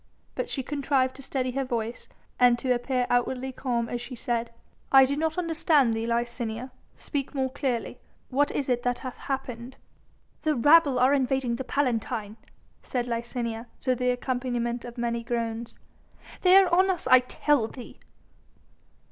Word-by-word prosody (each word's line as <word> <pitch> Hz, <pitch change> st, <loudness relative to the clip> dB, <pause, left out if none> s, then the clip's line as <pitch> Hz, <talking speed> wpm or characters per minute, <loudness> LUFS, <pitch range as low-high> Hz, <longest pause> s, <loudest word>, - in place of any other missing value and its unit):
But -, -, -3 dB
she 265 Hz, -, -2 dB
contrived 275 Hz, -2 st, 0 dB
to -, -, -10 dB
steady 255 Hz, -1 st, -2 dB
her 270 Hz, +2 st, -1 dB
voice 235 Hz, -2 st, -4 dB, 0.3 s
and 245 Hz, -1 st, +6 dB
to 250 Hz, +1 st, +1 dB
appear 250 Hz, +1 st, 0 dB
outwardly 250 Hz, +2 st, 0 dB
calm 240 Hz, -3 st, -2 dB
as 240 Hz, +1 st, -4 dB
she 250 Hz, -, -7 dB
said: 235 Hz, -1 st, -2 dB, 0.4 s
"I 270 Hz, -1 st, +8 dB
do 280 Hz, +2 st, -1 dB
not 315 Hz, +2 st, -1 dB
understand 320 Hz, -7 st, +2 dB
thee, 225 Hz, +1 st, -2 dB
Licinia, 235 Hz, +1 st, -2 dB, 0.2 s
speak 285 Hz, -1 st, -4 dB
more 265 Hz, -1 st, 0 dB
clearly. 260 Hz, -4 st, -2 dB, 0.3 s
What 285 Hz, +3 st, +2 dB
is 280 Hz, -, -2 dB
it 245 Hz, -2 st, +1 dB
that 245 Hz, 0 st, 0 dB
hath 255 Hz, -, -6 dB
happened?" 260 Hz, -2 st, -5 dB, 0.6 s
"The 310 Hz, -1 st, +1 dB
rabble 290 Hz, +2 st, +5 dB
are 255 Hz, +3 st, +4 dB
invading 265 Hz, -3 st, +1 dB
the 265 Hz, -, -4 dB
Palatine," 230 Hz, -5 st, -1 dB, 0.4 s
said 245 Hz, -2 st, -2 dB
Licinia, 235 Hz, -1 st, -3 dB
to 255 Hz, -, +1 dB
the 250 Hz, 0 st, 0 dB
accompaniment 245 Hz, -1 st, -2 dB
of 240 Hz, 0 st, -9 dB
many 235 Hz, -1 st, -2 dB
groans. 230 Hz, -1 st, -3 dB, 0.6 s
"They 365 Hz, 0 st, +6 dB
are 380 Hz, -3 st, +5 dB
on 375 Hz, +2 st, +5 dB
us 360 Hz, -2 st, -1 dB
I 255 Hz, -, +7 dB
tell 250 Hz, -1 st, +1 dB
thee." 245 Hz, +1 st, -11 dB
250 Hz, 160 wpm, -27 LUFS, 235-275 Hz, 0.6 s, I